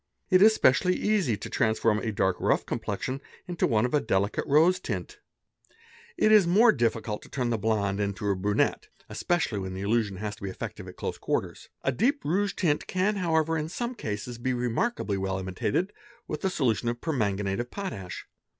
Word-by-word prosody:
It 185 0 +6
is 220 +2 +7
specially 180 +7 +3
easy 195 - +1
to - - -7
transform 110 -1 +1
a 110 - -2
dark 95 -3 +1
rough - - +1
complexion 130 +7 -3 0.2
into 175 -2 0
one 110 0 +2
of 125 - -3
a 150 - +3
delicate 100 +2 0
rose 165 +6 +4
tint; - - -5 1.0
it 215 - +4
is 210 -5 +6
more 220 +7 +6
difficult 115 -3 -1
to - - -14
turn 125 -3 -1
the 115 - 0
blonde 100 -2 0
into 100 0 -2
a 100 - +2
brunette, 100 +2 0 0.2
espcially 165 - 0
when 95 0 -5
the 95 - -5
illusion 105 -1 0
has 105 +1 -4
to - - -20
be 100 - -3
effective' 95 - -7
at - - -10
close - - -4
quarters. - - -3
A 135 - +2
deep 270 - 0
rouge 200 +6 +1
tint 155 -6 0
can 195 +3 0
however 165 -3 +1
"in 155 0 -2
some 240 +7 -3
cases 115 - -5
be 130 +2 -1
remarkably 120 - -1
well 95 0 -1
imitated 95 - -2 0.3
with 155 - -5
a 190 - +2
solution 120 - 0
of 120 0 -3
perman 115 -12 0
ganate 100 0 -2
of 120 0 -3
potash. 100 - -6
120 Hz, 195 wpm, -27 LUFS, -, 1.0 s, is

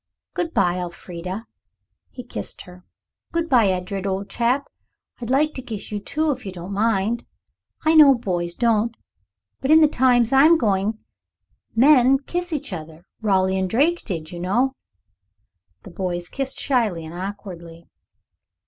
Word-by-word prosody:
Good 340 -2 -2
bye, 180 - +1
Elfrida." 180 +3 -6 0.6
He 250 - -9
kissed 245 - -6
her. 180 -1 -15 0.5
"Good 335 0 0
bye, 245 -8 +4
Edred, 190 +1 -2
old 195 +1 -3
chap. 250 +4 +1 0.5
I'd 235 -1 -6
like 300 +4 +2
to 260 - -6
kiss 220 -5 -7
you 210 - -2
too, 305 +9 -1
if 255 -2 -5
you 195 - -6
don't 180 +2 -7
mind. 220 +2 0 0.6
I 315 - +4
know 295 -4 +8
boys 175 -6 -3
don't, 230 0 +1 0.6
but 270 - -3
in 315 +1 +8
the 310 - +6
times 250 -3 +3
I'm 305 +5 +6
going 205 -4 +1
to 220 - -26 0.8
men 265 +1 +6
kiss 350 +6 -4
each 290 -9 -3
other. 160 0 -9 0.2
Raleigh 190 -2 +2
and 190 -1 -1
Drake 310 - +2
did, 165 -6 -5
you 175 - -7
know." 235 +10 +1 1.1
The 195 - -11
boys 175 -1 -4
kissed 270 -1 -4
shyly 220 - 0
and 160 - -9
awkwardly. 175 -3 -8
220 Hz, 155 wpm, -22 LUFS, 185-265 Hz, 1.1 s, know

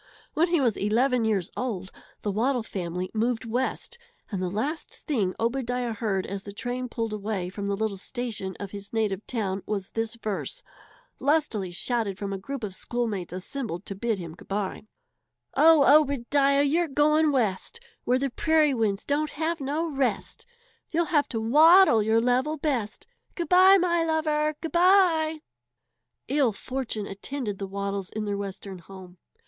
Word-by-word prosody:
When 330 +3 +3
he 340 -2 +2
was 240 -6 +1
eleven 235 +4 +2
years 200 -6 0
old 200 -7 -3 0.3
the 205 - 0
Waddle 240 +4 +1
family 180 -2 -4
moved 230 +1 0
West, 260 - -2 0.3
and 195 -3 -2
the 185 - -1
last 275 - -3
thing 210 - 0
Obadiah 245 0 -1
heard 200 -3 -1
as 200 0 -5
the 200 - -9
train 245 +4 -4
pulled 225 -2 -3
away 205 -3 -3
from 200 +2 -5
the 200 - 0
little 215 -1 -2
station 215 -3 -4
of 200 -2 -6
his 200 0 -8
native 215 -3 -1
town 200 -5 -2
was 200 -3 -3
this 225 0 -2
verse, 230 - -4 0.6
lustily 280 - +1
shouted 200 +2 -1
from 200 -1 -4
a 195 - -4
group 275 +5 -6
of 200 -3 -4
schoolmates 215 -5 -3
assembled 185 0 -5
to - - -4
bid 220 +2 -1
him 170 -3 -7
good - - -15
bye: 200 +1 -3 0.7
"Oh, 305 -2 +7
Obadiah, 280 0 +2
you're 325 +4 +2
going 300 +2 +3
West, 240 - -1 0.2
Where 250 - +2
the 275 0 -1
prairie 310 +1 +3
winds 215 -5 0
don't 295 +2 0
have 320 +1 -2
no 295 +5 -1
rest, 270 -9 -2 0.4
You'll 335 +1 +1
have 290 -2 +3
to 225 - -2
waddle 305 - +6
your 220 +2 +3
level 255 +6 +1
best. 260 -8 -2 0.3
Good 340 -3 -3
bye, 375 +2 +7
my 345 -2 +2
lover, 305 -1 0
good 325 - -4
bye!" 340 -4 +4 0.9
Ill 270 -5 +2
fortune 235 -2 -4
attended 205 +1 -5
the 195 - -4
Waddles 200 -1 -3
in 215 0 -4
their 205 -1 -1
western 195 -1 -6
home. 180 0 -13
235 Hz, 165 wpm, -26 LUFS, 200-290 Hz, 0.9 s, Oh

